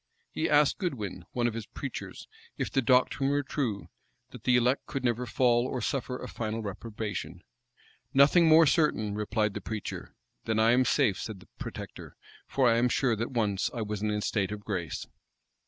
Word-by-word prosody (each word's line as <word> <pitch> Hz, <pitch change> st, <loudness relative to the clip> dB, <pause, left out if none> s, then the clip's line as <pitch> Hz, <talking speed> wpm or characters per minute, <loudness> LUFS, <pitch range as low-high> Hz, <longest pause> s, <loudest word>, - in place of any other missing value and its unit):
He 160 Hz, -, -1 dB
asked 150 Hz, -1 st, +4 dB
Goodwin, 110 Hz, -, -4 dB
one 120 Hz, -1 st, 0 dB
of 120 Hz, -, +1 dB
his 115 Hz, -2 st, -6 dB
preachers, -, -, -7 dB, 0.3 s
if -, -, -2 dB
the 135 Hz, -, +2 dB
doctrine 130 Hz, +2 st, +3 dB
were 145 Hz, 0 st, +1 dB
true, 130 Hz, -7 st, -3 dB, 0.4 s
that -, -, -12 dB
the 125 Hz, -, +4 dB
elect 125 Hz, +2 st, +2 dB
could 135 Hz, -, -4 dB
never 120 Hz, 0 st, 0 dB
fall, 120 Hz, +1 st, +2 dB
or 130 Hz, -, -3 dB
suffer 125 Hz, +2 st, -2 dB
a -, -, -7 dB
final 110 Hz, 0 st, -4 dB
reprobation. 105 Hz, -4 st, -5 dB, 0.7 s
"Nothing 145 Hz, +6 st, +6 dB
more 160 Hz, +1 st, +7 dB
certain," 135 Hz, -9 st, +2 dB
replied 105 Hz, 0 st, 0 dB
the -, -, -5 dB
preacher. 110 Hz, -2 st, -6 dB, 0.3 s
"Then 110 Hz, -1 st, 0 dB
I 110 Hz, +1 st, +5 dB
am 125 Hz, +1 st, +4 dB
safe," 120 Hz, -8 st, +2 dB
said 110 Hz, -4 st, -6 dB
the 95 Hz, -, -17 dB
protector; -, -, -8 dB, 0.3 s
"for 135 Hz, -2 st, +2 dB
I 115 Hz, -1 st, +4 dB
am 120 Hz, +1 st, +3 dB
sure 120 Hz, 0 st, +2 dB
that 115 Hz, +2 st, -3 dB
once 105 Hz, -6 st, 0 dB
I 115 Hz, -, -2 dB
was 105 Hz, -1 st, -4 dB
in 105 Hz, -, 0 dB
a 105 Hz, 0 st, -1 dB
state 100 Hz, -2 st, -1 dB
of 105 Hz, -1 st, -5 dB
grace." 90 Hz, -6 st, -3 dB
115 Hz, 190 wpm, -29 LUFS, 105-130 Hz, 0.7 s, more